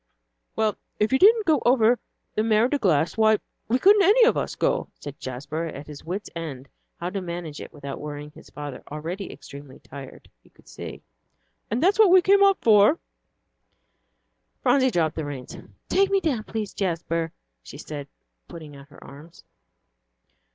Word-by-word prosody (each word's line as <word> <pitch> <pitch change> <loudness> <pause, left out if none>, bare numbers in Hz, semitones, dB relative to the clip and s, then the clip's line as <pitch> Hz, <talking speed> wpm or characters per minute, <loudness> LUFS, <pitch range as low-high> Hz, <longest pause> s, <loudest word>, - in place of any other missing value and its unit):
"Well, 215 -2 0 0.2
if 215 +5 +1
you 265 - +4
didn't 435 +2 +6
go 310 -6 +3
over 240 -1 +4 0.3
the 215 - 0
Mer 220 +1 +3
de 285 +2 -1
Glace, 170 - +1
why, 220 -1 +5 0.3
we 240 - +2
couldn't 405 +8 +6
any 420 +6 +6
of 480 - +3
us - - -2
go," - - 0
said 145 -1 -9
Jasper, 145 +6 -5
at 145 -3 -7
his 150 -1 -11
wits' 190 +5 -5
end 145 -5 -6 0.3
how 175 +1 -3
to 195 0 -3
manage 170 -4 -6
it - - -9
without 140 -2 -7
worrying 150 0 -7
his - - -16
father, 145 -3 -7
already 170 +6 -5
extremely 140 -1 -12
tired, 135 -2 -12
he - - -24
could - - -25
see, - - -9 0.7
"and 235 +7 -1
that's 395 +4 +3
what 430 -3 +7
we've 370 0 +6
come 400 +2 +5
up 395 -1 +5
for 215 +6 +6 0.8
" - - -49
Phronsie 260 -2 +4
dropped 165 -7 0
the 160 - -3
reins. 140 -3 -7 0.3
"Take 390 0 +2
me 395 0 +3
down, 265 - -1
please, 215 -2 -4
Jasper," 165 -3 -2 0.3
she - - -11
said, 145 -2 -7 0.4
putting 155 -4 -10
out 140 +1 -14
her 145 - -16
arms. 155 +5 -14
180 Hz, 175 wpm, -24 LUFS, -, 0.8 s, what